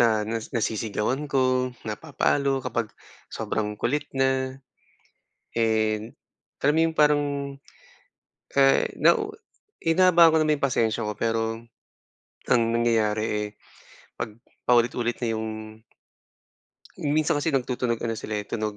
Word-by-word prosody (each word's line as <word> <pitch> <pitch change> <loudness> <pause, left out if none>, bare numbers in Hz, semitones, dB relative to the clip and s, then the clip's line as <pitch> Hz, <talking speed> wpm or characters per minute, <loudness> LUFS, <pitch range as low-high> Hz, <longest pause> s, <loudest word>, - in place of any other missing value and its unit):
na 110 -3 +3
na 115 +1 -1 0.2
nasisigawan 115 +5 -1
ko, 130 -1 +2 0.2
napapalo 140 +3 0
kapag 115 -3 -2 0.4
sobrang 105 -1 -3
kulit 145 +5 -1
na. 130 0 0 1.0
And, 110 -1 +1 0.5
kami 150 +3 +3
yung 165 - 0
parang 150 -1 +4 1.3
eh, 135 -1 +5
na - - +4 0.6
hinahabaan 170 0 +6
ko - - +3
naman 155 -1 +2
yung - - 0
pasensya 115 -3 0
ko - - -1
pero, 115 0 0 0.9
ang 120 -2 +5
nangyayari, 110 -2 +2
eh, 105 0 -2 0.7
'pag 105 - -4 0.3
paulit-ulit 120 0 +2
na - - +1
yung 110 0 -3 1.5
Hmm, 145 +1 -1
minsan 155 -1 +2
kasi 155 - -1
nagtutunog 125 -4 0
ano 115 - -1
sila, 110 -1 -4
eh, 105 - -3
tunog 105 0 -3
120 Hz, 120 wpm, -25 LUFS, 110-140 Hz, 1.5 s, hinahabaan